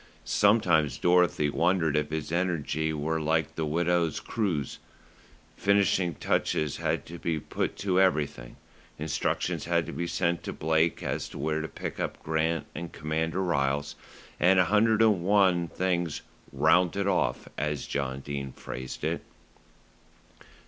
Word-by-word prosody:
Sometimes 85 - +3
Dorothy 85 -3 +3
wondered 85 -2 +2
if 75 0 0
his 80 0 -4
energy 80 -3 0
were 80 +1 -1
like 80 +1 0
the 80 -1 -2
widow's 85 0 +1
cruse. 90 - -2 0.8
Finishing 95 -3 +2
touches 75 -2 0
had - - -1
to 85 +1 -9
be 80 -2 -1
put - - -3
to 95 -2 +2
everything. 75 -9 0 0.4
Instructions 75 -1 -1
had 85 -1 +1
to 85 - -6
be 85 +4 -3
sent 85 0 0
to - - -5
Blake 80 +1 +1
as - - -3
to - - -9
where 75 +2 -1
to 80 - -4
pick - - -6
up - - -3
Grant 80 +1 0
and 85 -1 -6
Commander 80 +4 -2
Ryles, 70 -4 0 0.5
and 95 +2 +5
a 90 - +5
hundred 110 +3 +3
and 105 -5 +3
one 95 -3 +3
things 85 -2 -1 0.3
"rounded 90 +3 +3
off," 100 - 0
as 75 -1 -2
John 70 -1 -3
Dene 70 -2 -5
phrased 65 +2 -7
it. 80 +2 -1
80 Hz, 140 wpm, -28 LUFS, 75-90 Hz, 0.8 s, and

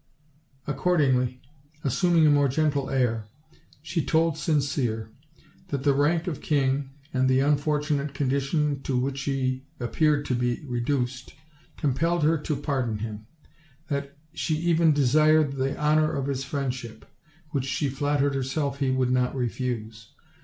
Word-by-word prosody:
Accordingly, 135 -5 +1 0.4
assuming 165 +4 +3
a 150 - +6
more 145 -1 +4
gentle 145 0 0
air, 115 -5 0 0.6
she 165 0 -1
told 165 -1 +2
Sin 155 -3 +1
cere 120 -6 -2 0.6
that 140 -6 -3
the 140 -1 +4
rank 155 +5 +2
of 170 -7 -4
king, 135 -2 +1 0.2
and 130 0 +2
the 130 0 +4
unfortunate 150 0 0
condition 140 +1 0
to 135 -2 -1
which 135 +2 -1
he 130 -1 -1 0.2
appeared 145 +4 +1
to - - -1
be 120 +1 -1
reduced, 125 0 -2 0.4
compelled 160 +4 +1
her 160 +1 +3
to 150 +1 -2
pardon 135 -6 -1
him; 110 0 -6 0.6
that 140 -1 -3 0.2
she 155 - -1
even 165 0 +3
desired 150 +2 +4
the 135 0 -2
honor 155 +1 +3
of 140 -3 -2
his 135 -1 -2
friend 140 -2 -2
ship, 120 -3 -9 0.5
which 135 -3 -1
she 145 +2 -1
flattered 145 +1 0
herself 135 +1 -2
he 135 -2 +1
would 130 -1 +1
not 125 +1 +1
refuse. 115 -3 -4
140 Hz, 145 wpm, -26 LUFS, 130-150 Hz, 0.6 s, a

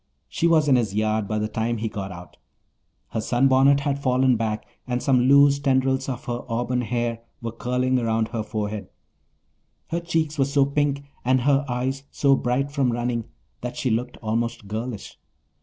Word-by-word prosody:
She 170 - 0
was 160 -3 +4
in 135 -3 +5
his 110 -5 -1
yard 110 -1 0
by 110 - -1
the 105 0 0
time 110 +2 -1
he 110 +1 -2
got 100 -3 -5
out. 90 0 -11 0.7
Her 110 - -2
sunbonnet 135 +4 +4
had 140 -1 -1
fallen 130 -1 +3
back 110 -1 -2 0.2
and 125 -1 -1
some 125 -2 +3
loose 140 +1 +6
tendrils 130 -1 +1
of 130 -1 -5
her 120 -1 -3
auburn 120 +2 0
hair 120 -1 -2 0.2
were 115 -1 -4
curling 125 +2 0
around 115 -1 0
her 115 -2 -3
forehead. 105 -2 -4 1.0
Her 170 - -1
cheeks 160 -3 -1
were 135 - +4
so 140 0 +3
pink 140 0 0 0.2
and 130 +1 +3
her 140 +2 +3
eyes 130 +2 -2
so 140 -1 +3
bright 135 +3 -1
from 135 -4 +1
running 120 -1 -2 0.4
that 125 0 -5
she 130 - 0
looked 125 +3 -2
almost 115 -1 -2
girlish. 110 +1 -5
125 Hz, 175 wpm, -24 LUFS, 115-135 Hz, 1.0 s, loose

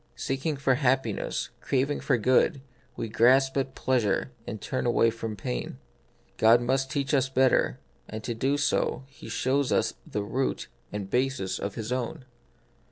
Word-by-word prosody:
Seeking 140 +3 -2
for 135 -1 +2
hap 130 0 +2
piness, 110 -3 -3
craving 140 +2 0
for 125 - +1
good, 130 +5 +3 0.3
we 115 - -3
grasp 130 +5 +4
at 135 -1 -1
pleasure 125 -2 0 0.2
and 110 - -5
turn 130 - -2
away 115 -1 +3
from 115 -1 -5
pain. 60 -9 -4 0.6
God 115 +2 +6
must 130 +2 0
teach 140 0 -1
us 135 -2 +3
better, 130 - +2 0.3
and 110 0 -6
to 120 - -2
do 135 +5 0
so 145 - 0
He 135 -4 -13
shows 130 +4 0
us - - +2
the 105 - -3
root 130 +6 -2 0.2
and 105 -2 -4
basis 125 -4 -1
of 100 0 -4
His 115 0 -5
own. 130 +3 -3
130 Hz, 165 wpm, -27 LUFS, 115-135 Hz, 0.6 s, God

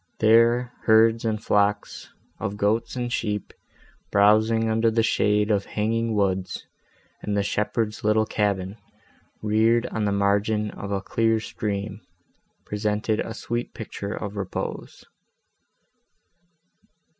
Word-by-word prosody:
There 115 +2 +4
herds 115 +1 +4
and 110 -1 0
flocks 105 0 0 0.3
of 100 - -4
goats 105 +5 0
and 120 -1 -3
sheep, 105 -3 -2 0.6
browsing 110 +2 +4
under 110 +1 +2
the 115 0 +1
shade 105 -1 +2
of 100 -1 +1
hanging 115 +1 -1
woods, 95 -2 -1 0.6
and 105 -1 -2
the 100 - +2
shepherd's 105 +2 -2
little 110 +1 +3
cabin, 100 -2 -1 0.7
reared 110 +2 +3
on 110 -1 -1
the 100 - +1
margin 100 +2 +1
of 100 - -7
a 100 -1 -1
clear 115 +2 +1
stream, 105 -1 -4 0.6
presented 105 +1 -1
a 115 - -4
sweet 120 +1 -4
picture 105 -2 -5
of 105 -1 -6
repose. 100 -2 -5
105 Hz, 120 wpm, -24 LUFS, 100-115 Hz, 0.7 s, There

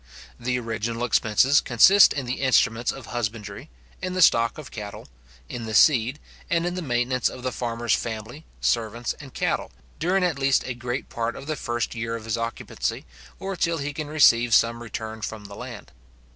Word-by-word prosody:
The 125 +1 -1
original 115 0 -3
expenses 125 +3 +3
consist 190 - +6
in 140 -3 -3
the 125 +3 -3
instruments 125 -3 +3
of 135 - -9
husbandry, 110 -3 -5 0.3
in 185 0 -3
the 185 - +1
stock 115 -6 +4
of 150 -4 -9
cattle, 105 -2 -8 0.4
in 115 - -6
the 110 - -3
seed, 130 +1 +5 0.3
and 170 0 +1
in 175 - -1
the 180 - -4
maintenance 125 -3 0
of 125 - -10
the 130 - -1
farmer's 120 -1 -1
family, 115 +6 -4 0.2
servants, 115 +1 0
and 135 -3 -11
cattle, - - -1 0.3
during 185 +3 +1
at 170 -6 0
least 135 0 +3
a 130 - -3
great 120 +2 -4
part 115 0 -3
of 135 - -9
the 155 +1 -2
first 120 -4 -3
year 115 -1 -3
of 110 -1 -7
his 115 - -1
occupancy, 115 0 -3 0.3
or 195 0 -4
till 170 -1 0
he 145 -1 -4
can 155 0 -5
receive 120 -6 +5
some 115 +1 +3
return 110 -1 -6
from 105 -1 -6
the 100 0 -10
land. - - -9
120 Hz, 185 wpm, -25 LUFS, 115-140 Hz, 0.4 s, consist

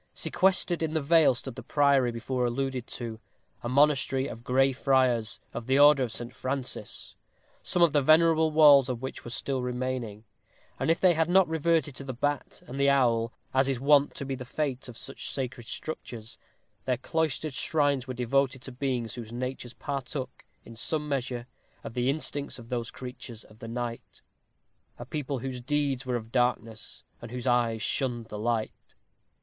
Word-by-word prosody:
Sequestered 185 -2 +1
in 160 0 -1
the 160 - +2
vale 160 -3 +5
stood 130 +1 -6
the - - -8
Priory 140 -4 +3
before 125 +2 -2
alluded 125 0 -1
to 115 -2 -6 0.4
a 120 - -4
Monastery 135 -1 +3
of 115 -4 -7
Gray 135 +2 +3
Friars, 125 -4 +2
of 115 +1 -6
the 130 +1 +3
Order 145 -1 +7
of 125 -3 -1
St. 120 0 -4
Francis 130 0 -5 0.5
some 175 - +2
of 170 - +4
the 145 - +4
venerable 160 +2 +5
walls 145 -4 +7
of 125 0 -3
which 130 - -5
were - - -7
still 130 +2 -2
remaining; 125 -4 -3 0.6
and - - 0
if 165 - +3
they 185 -2 +5
had 160 0 +1
not 190 0 +5
reverted 160 -1 +1
to - - -5
the 130 -2 -5
bat 145 +3 -2
and 135 +2 -7
the 140 0 +4
owl, 115 -4 +3 0.2
as 135 +1 +3
is 130 -3 0
wont 145 +1 +4
to 140 - -5
be 135 - -3
the 130 -1 -5
fate 130 0 -3
of 120 -2 -10
such - - -6
sacred 125 -3 -4
structures, 120 -7 -7 0.5
their 125 -2 +1
cloistered 155 +2 -1
shrines 140 -1 +1
were 130 - -4
devoted 130 +1 +1
to 130 - -6
beings 125 -3 -2
whose 115 -2 -7
natures 125 0 -5
partook, 135 -2 -5 0.2
in 115 - -12
some 150 +6 -2
measure, 125 -4 -2 0.4
of - - -7
the 125 +2 +1
instincts 145 -1 -2
of 120 -2 -12
those 120 -2 -2
creatures 125 -3 -8
of 110 +1 -19
the 115 - -8
night 120 0 -6 0.7
a 120 - -7
people 140 0 -3
whose 125 0 -5
deeds 140 -1 -1
were 125 - 0
of 115 -1 -5
darkness, 120 -3 -1 0.2
and 115 - -8
whose 125 +1 -6
eyes 120 -3 +2
shunned 120 -4 -1
the 105 - -6
light. 115 0 -3
130 Hz, 180 wpm, -28 LUFS, 120-145 Hz, 0.7 s, Order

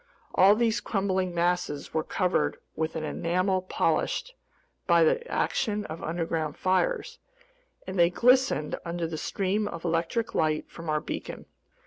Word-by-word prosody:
All 195 +3 +6
these 230 0 +1
crumbling 190 -3 0
masses 175 -3 -1
were 160 - +1
covered 180 +2 0 0.2
with 160 +1 -2
an 160 - -3
enamel 185 +4 0
polished 345 - 0 0.5
by - - +5
the 485 0 +2
action 210 -3 0
of 160 +1 -7
underground 160 -2 -2
fires, 190 - 0 0.7
and 190 -1 -4
they 170 0 +6
glistened 250 - +3
under 170 0 -3
the 160 -1 -4
stream 200 +2 -1
of 170 -3 -7
electric 170 +7 -1
light 155 -1 0
from 165 -1 -7
our 155 0 +1
beacon. - - -6
180 Hz, 140 wpm, -27 LUFS, 165-205 Hz, 0.7 s, All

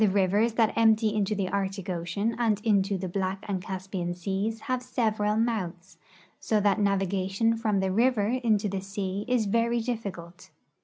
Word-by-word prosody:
The - - +5
rivers 200 +4 +2
that 225 -1 +2
emj)ty 220 -1 +3
into 210 0 0
the 195 -2 -1
Arctic 195 -1 -2
ocean 185 +5 -2
and 220 -4 +2
into 200 -3 +2
the 185 0 -4
Black 190 +1 -3
and 190 -3 -2
Caspian 185 -1 -4
seas 195 +5 -2
have 255 -1 -2
several 220 -4 0
mouths, 195 -6 -2 0.4
so 215 - +1
that 205 0 +2
navigation 195 +2 +1
from 215 -3 0
the 190 0 0
river 230 +1 +2
into 230 -4 +1
the 195 -1 -3
sea 195 +1 -4
is 250 -3 +2
A'ery 230 +2 +1
difficult. 185 -7 -6
200 Hz, 165 wpm, -27 LUFS, 190-225 Hz, 0.4 s, The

